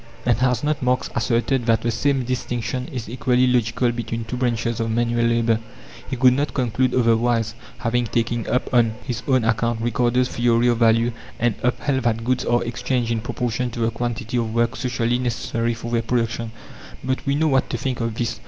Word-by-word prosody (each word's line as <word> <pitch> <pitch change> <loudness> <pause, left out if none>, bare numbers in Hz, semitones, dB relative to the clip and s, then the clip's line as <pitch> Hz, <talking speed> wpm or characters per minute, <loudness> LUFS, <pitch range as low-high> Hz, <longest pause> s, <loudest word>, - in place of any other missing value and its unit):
And 120 -2 +4
has 125 -1 +1
not 150 0 0
Marx 125 0 0
asserted 120 +2 +1
that 115 -1 +3
the 120 - +1
same 135 +3 +1
distinction 125 0 -3
is 125 -4 -6
equally 125 +2 +2
logical 120 -1 +2
between 115 -1 -4
two 115 - -4
branches 120 -2 -1
of 115 0 -1
manual 120 +1 +1
labour? 115 -1 +2 0.5
He 130 - -2
could 125 0 +5
not 140 +2 -1
conclude 125 0 +1
otherwise, 115 -2 +2 0.2
having 120 0 0
taken 115 +1 -1
up 125 +2 0
on 115 -3 +3
his 125 -3 -3
own 130 -3 +3
account 115 +1 +1
Ricardo's 120 +2 +1
theory 120 0 +2
of 120 -1 +1
value, 115 +1 +4 0.3
and 120 -1 +2
upheld 130 +2 0
that 115 -1 +1
goods 130 +1 0
are 120 0 +2
exchanged 120 0 -1
in 115 -1 0
proportion 125 +1 -2
to 120 - -7
the 115 0 +1
quantity 120 0 -3
of 115 -2 -1
work 120 +1 +1
socially 120 -1 0
necessary 115 -1 -1
for 115 +1 -7
their 115 -1 +2
production. 115 -1 -1 0.5
But 130 0 -1
we 140 - +2
know 155 +1 +2
what 135 -2 +2
to - - -2
think 130 -3 -3
of 115 -1 -2
this. 115 0 -2
120 Hz, 195 wpm, -22 LUFS, 115-125 Hz, 0.5 s, could